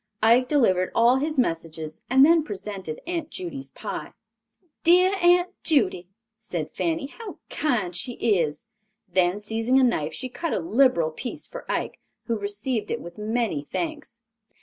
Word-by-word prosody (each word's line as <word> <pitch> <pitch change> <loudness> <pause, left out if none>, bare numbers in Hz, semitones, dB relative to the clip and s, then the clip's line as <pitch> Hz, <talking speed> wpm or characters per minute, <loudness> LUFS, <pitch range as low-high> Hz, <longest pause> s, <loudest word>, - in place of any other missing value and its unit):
Ike 240 +3 +5
delivered 190 -11 +2
all 235 +3 +5
his 300 +2 -2
messages 165 -7 -2
and 265 +2 +7
then 330 +1 +5
presented 195 - -6
Aunt 335 -2 -3
Judy's 335 -8 -6
pie. - - -6 0.7
"Dear 360 +3 +5
Aunt 350 +1 +4
Judy," 220 - +2 0.3
said 160 -4 -5
Fanny, 170 +5 -1
"how 450 -4 -7
kind 215 - 0
she 245 +8 -2
is." 190 -4 0 0.4
Then 180 0 +2
seizing 225 +5 +1
a - - +4
knife 160 -11 +1
she 255 - -4
cut 330 +6 -3
a - - +1
liberal 250 - +3
piece 240 +10 -6
for - - -7
Ike, - - -2 0.3
who 230 -3 -1
received 205 +3 -3
it - - -1
with 170 +3 -10
many 215 -8 -1
thanks. 295 - -5
235 Hz, 150 wpm, -25 LUFS, 180-290 Hz, 0.7 s, and